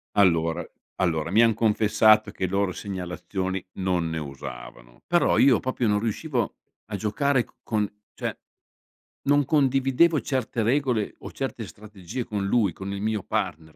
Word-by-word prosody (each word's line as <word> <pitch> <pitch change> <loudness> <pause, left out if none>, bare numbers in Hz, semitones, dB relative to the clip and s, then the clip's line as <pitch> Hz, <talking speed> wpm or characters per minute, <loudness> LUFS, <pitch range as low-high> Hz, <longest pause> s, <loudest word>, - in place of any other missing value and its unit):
Allora, 85 -4 +2 0.2
allora, 85 -2 0
mi 110 - +5
han 115 -1 +5
confessato 110 -1 +4
che 95 - -2
loro 100 +1 0
segnalazioni, 95 0 -4
non 90 -3 0
ne 80 - -3
usavano. - - -9
Però 175 0 +3
io 130 -4 +6
proprio 130 -2 -1
non 105 0 +2
riuscivo, 115 +2 -2 0.3
a 105 - -4
giocare 125 +6 +1
c - - -25
con 105 -2 0 0.3
cioè, - - -4 0.9
non 145 0 +3
condividevo 135 +2 +3
certe 130 -1 -2
regole, 125 -3 +1
o - - -8
certe 130 -5 -4
strategie 100 +5 -7
con 100 -2 -2
lui, 105 -2 +2
con 95 +1 -6
il 100 - -4
mio 110 -2 -1
partner, 85 -7 -3
105 Hz, 150 wpm, -25 LUFS, 95-125 Hz, 0.9 s, io